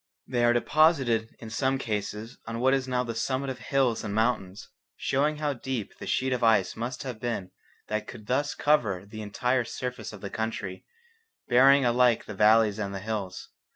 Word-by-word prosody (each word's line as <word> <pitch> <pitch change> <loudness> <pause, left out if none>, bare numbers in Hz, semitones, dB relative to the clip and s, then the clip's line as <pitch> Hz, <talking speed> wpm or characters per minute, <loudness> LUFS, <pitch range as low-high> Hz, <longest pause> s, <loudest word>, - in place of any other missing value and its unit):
They 120 -2 0
are 120 - +5
deposited 120 -4 +2
in 110 -1 -9
some 130 +3 +1
cases 110 -1 -4
on 115 0 -4
what 130 +2 +3
is 135 -1 0
now 125 -1 0
the 115 -2 -4
summit 130 +4 -1
of 130 - -8
hills 130 -5 +1
and 105 -1 -3
mountains, 110 -4 -1 0.3
showing 150 +3 0
how 150 -1 -1
deep 125 -4 -5
the - - -7
sheet 130 0 +1
of 125 -1 -2
ice 110 -5 +3
must 120 +4 -4
have 125 -5 -6
been 115 -6 -3 0.4
that 110 0 -2
could 110 -4 -10
thus 140 +5 0
cover 105 -11 +1
the 110 +2 -8
entire 125 +5 0
surface 125 +2 -5
of 105 -3 -11
the 100 - -6
country, 105 -4 -4 0.6
burying 135 +2 +6
alike 120 -1 +3
the 105 - -7
valleys 110 +1 +4
and 100 -2 -3
the - - -3
hills. 100 -3 -5
120 Hz, 190 wpm, -27 LUFS, 110-130 Hz, 0.6 s, burying